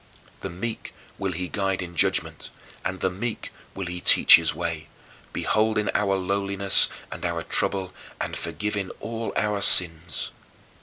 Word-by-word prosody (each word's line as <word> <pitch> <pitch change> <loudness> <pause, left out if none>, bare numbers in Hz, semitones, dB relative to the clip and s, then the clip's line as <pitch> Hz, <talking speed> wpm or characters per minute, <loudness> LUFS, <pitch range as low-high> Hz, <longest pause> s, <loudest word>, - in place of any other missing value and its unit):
" - - -28
"The 95 - -4
meek 105 +6 -6 0.2
will 95 -1 -1
he 90 +2 -3
guide 95 0 -1
in 85 -1 -9
judgment; - - -1 0.3
and 95 0 -4
the 95 - +1
meek 110 +5 -5 0.2
will 95 - -4
he 90 0 -5
teach - - +8
his 80 -1 0
way; 85 -2 -4 0.4
beholding 110 -1 +1
our 100 -1 +1
lowliness 100 +1 +3 0.2
and - - -7
our - - -2
trouble 95 -2 -1 0.3
and - - -3
forgiving 105 -2 -3
all 115 0 -4
our 105 -1 0
sins." 85 -2 +2
95 Hz, 150 wpm, -25 LUFS, 90-105 Hz, 0.4 s, teach